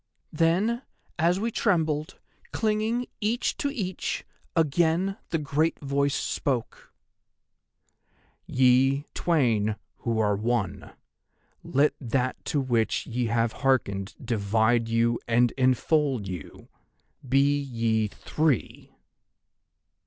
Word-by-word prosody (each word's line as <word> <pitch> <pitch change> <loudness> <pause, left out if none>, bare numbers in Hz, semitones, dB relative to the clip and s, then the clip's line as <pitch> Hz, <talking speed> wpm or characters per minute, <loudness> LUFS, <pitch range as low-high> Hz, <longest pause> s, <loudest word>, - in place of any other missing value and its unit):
"'Then, 185 +10 +2 0.4
as 175 +3 +3
we 230 +3 -1
trembled, 160 -9 0 0.3
clinging 220 +3 0
each 225 +4 0
to 285 - -1
each, 195 -10 -3 0.3
again 165 +4 +2
the 165 - 0
great 150 +2 0
Voice 140 0 0
spoke: 125 -5 -3 1.6
"'"Ye 130 +2 +3
twain 115 -11 +1 0.2
who 115 -2 -2
are 105 -2 +2
One—let 120 +5 -3
That 130 +1 -1
to 145 - 0
which 120 -4 0
ye 120 0 -2
have 115 0 +1
hearkened 100 -8 0
divide 115 0 +1
you 115 +1 +2
and 120 0 +3
enfold 130 -2 +1
you! 90 -5 -8 0.6
Be 140 +2 +3
ye 115 -5 0
Three!" 150 +3 -2
135 Hz, 95 wpm, -26 LUFS, 115-160 Hz, 1.6 s, as